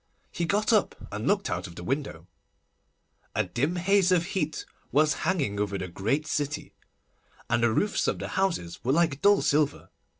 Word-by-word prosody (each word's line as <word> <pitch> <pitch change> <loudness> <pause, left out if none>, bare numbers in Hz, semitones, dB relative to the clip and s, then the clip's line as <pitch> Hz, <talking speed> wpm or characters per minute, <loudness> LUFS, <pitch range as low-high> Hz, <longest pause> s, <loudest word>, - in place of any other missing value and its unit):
He 170 - -2
got 210 +6 +1
up 215 - +2 0.2
and 105 +5 -4
looked 200 0 +2
out - - -3
of 85 - -12
the 90 - -8
window. 125 - -3 1.1
A 110 - +2
dim 130 - -1
haze 190 +1 +3
of 175 -2 +3
heat 155 -5 -2 0.3
was 155 +1 +4 0.2
hanging 140 - 0
over 100 -1 -1
the 95 - -4
great 115 - -1
city, 150 -2 -3 0.8
and 120 - +3
the 120 -1 +3
roofs 205 - +1
of - - 0
the - - -5
houses 170 - -1
were 130 +3 +2
like 160 -3 +2
dull 205 0 +5
silver. 145 0 +1
150 Hz, 175 wpm, -27 LUFS, -, 1.1 s, dull